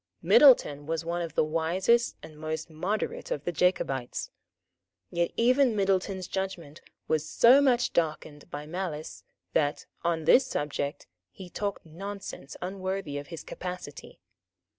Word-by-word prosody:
Middleton 150 - +6
was 165 0 -2
one 170 +1 -2
of 165 -1 -5
the - - +4
wisest 175 +9 +1
and 155 - -11
most 155 +1 -5
moderate 210 - -3
of - - -3
the - - -1
Jacobites. 145 -7 0 0.8
Yet 170 0 +1
even 250 0 +4
Middleton's 190 -2 0
judgment 175 -6 -5 0.3
was 155 -1 +1
so 255 +4 +6
much 245 -3 +2
darkened 155 -3 -2
by 145 +1 -6
malice 160 -2 -5 0.3
that, 145 -2 +1 0.2
on 165 -2 0
this 260 - +6
subject, 145 -1 -3 0.2
he 180 - -11
talked 200 -1 -3
nonsense 190 -3 -8
unworthy 185 -5 -3
of 145 - -9
his 165 -2 -8
capacity. 180 -5 -7
175 Hz, 135 wpm, -28 LUFS, 155-195 Hz, 0.8 s, Middleton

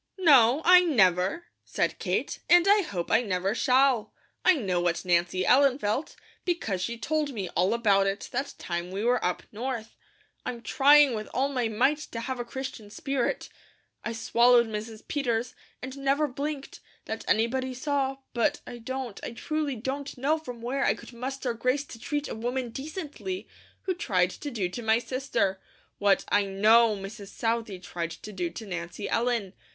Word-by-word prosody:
"No, 285 -5 +5
I 360 +1 +9
never," 200 - +2 0.2
said - - -1
Kate, - - -2
"and 350 +1 +6
I 410 +1 +6
hope 185 - -4
I - - +5
never 195 -3 -1
shall. 255 -3 +2 0.3
I 370 - +6
know 190 - 0
what 175 +1 0
Nancy 175 +1 +2
Ellen 270 0 +5
felt, 220 +5 -2 0.3
because 280 - -1
she 235 +5 -3
told 300 +2 -1
me 190 -4 -3
all 180 +2 +1
about 205 -4 +3
it 195 +2 -3
that 270 +3 -3
time 175 0 -4
we 195 +3 -4
were 245 +1 +2
up 180 - -1
North. 230 0 -5 0.5
I'm 235 -1 -5
trying 285 -1 +6
with 215 -1 -4
all 270 +2 +2
my 250 -4 0
might 255 +7 +2
to 235 -6 -6
have 260 +1 -4
a - - -1
Christian 255 -3 -7
spirit. 265 +4 -2 0.6
I 235 - -3
swallowed 235 +1 +4
Mrs. 220 0 -7
Peters, 245 -5 -1 0.3
and 260 +1 -6
never 275 +2 +2
blinked, 280 +1 -5 0.3
that - - -5
anybody 255 +3 +1
saw; 270 0 -1 0.2
but 290 +5 +1
I 240 -1 -8
don't, 255 -2 -5
I - - -5
truly 300 +2 -2
don't 270 +4 -5
know 295 +5 +1
from 245 -6 -9
where 270 +3 -1
I - - +3
could - - -12
muster 255 +1 -3
grace 255 +5 0
to 230 - -12
treat 290 +4 -2
a - - -5
woman 245 +2 -3
decently, 315 +6 -6 0.4
who 375 - 0
tried 185 - +1
to 290 - -6
do 215 -9 -1
to 180 +7 -6
my 220 0 +3
sister, 240 -6 -1 0.4
what 200 -1 +3
I 205 0 +3
KNOW 215 +3 +4
Mrs. 200 +1 -8
Southey 225 -2 -2
tried 175 -2 -5
to 190 +6 -9
do 180 -3 -2
to 200 +6 -8
Nancy 175 +1 -5
Ellen. 230 -5 0
240 Hz, 175 wpm, -27 LUFS, 205-275 Hz, 0.6 s, I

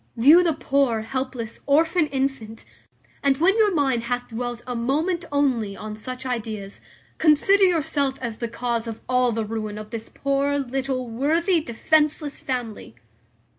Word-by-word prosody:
View 295 +10 +7
the 335 -2 +2
poor, 275 -6 +1
helpless, 255 -1 -4
orphan 320 +3 +3
infant; 265 -6 -3 0.6
and 275 -1 +2
when 365 +7 +3
your 425 -2 +4
mind 265 -8 +1
hath 245 0 -3
dwelt 240 +1 -5
a 250 - -4
moment 310 +9 0
only 245 -9 0
on 215 0 -6
such 255 +4 -7
ideas, 215 -5 -5 0.4
consider 345 +6 +5
yourself 305 -6 +1
as 235 -3 -5
the 235 - -2
cause 235 0 -2
of 225 -1 -6
all 250 -1 +2
the 225 -1 -2
ruin 215 -1 -4
of 215 0 -9
this 225 -1 -6
poor, 280 +1 0
little, 265 -1 -2
worthy, 320 - +1
defenceless 300 +3 0
family. 235 - -5
260 Hz, 150 wpm, -23 LUFS, 230-290 Hz, 0.6 s, View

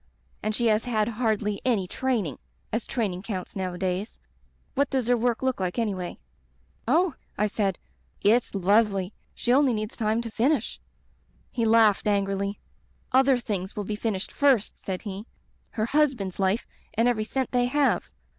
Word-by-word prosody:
And 215 0 -1
she 240 - 0
has 220 0 +3
had 220 -4 +1
hardly 215 -3 0
any 220 -8 +1
training 225 - -1 0.2
— - - -38
as 225 +1 -1
training 200 -8 -1
counts 195 -3 -5
nowadays. 185 +1 -2 0.6
)^at 280 +1 +2
does 260 -3 0
her 245 - +4
work 240 +1 0
look 260 -4 0
like 185 +1 -2
anyway?' 195 -6 -2 0.7
"'Oh,' 330 +6 +3 0.2
I 210 - +2
said, 200 -3 0 0.4
'it's 225 +2 +3
lovely! 195 0 +2 0.2
She 240 - +1
only 265 -3 +4
needs 215 +1 -4
time 220 0 +1
to 230 -1 -6
finish 250 +2 +1 0.4
' - - -37
"He 230 - 0
laughed 220 -2 +4
angrily. 200 0 0 0.5
'Other 265 0 +5
things 200 -5 -4
will 210 - -2
be 210 +2 -3
finished 210 -3 -2
first,' 270 -7 +2
said 185 -2 -4
he. 205 +1 -6 0.4
'Her 215 -2 -1
husband's 250 -10 +1
life 195 +4 +1 0.3
and 230 +2 +3
every 230 -3 +1
cent 260 +3 -2
they 245 -1 +3
have. 290 +2 +1
215 Hz, 165 wpm, -26 LUFS, 195-245 Hz, 0.7 s, Other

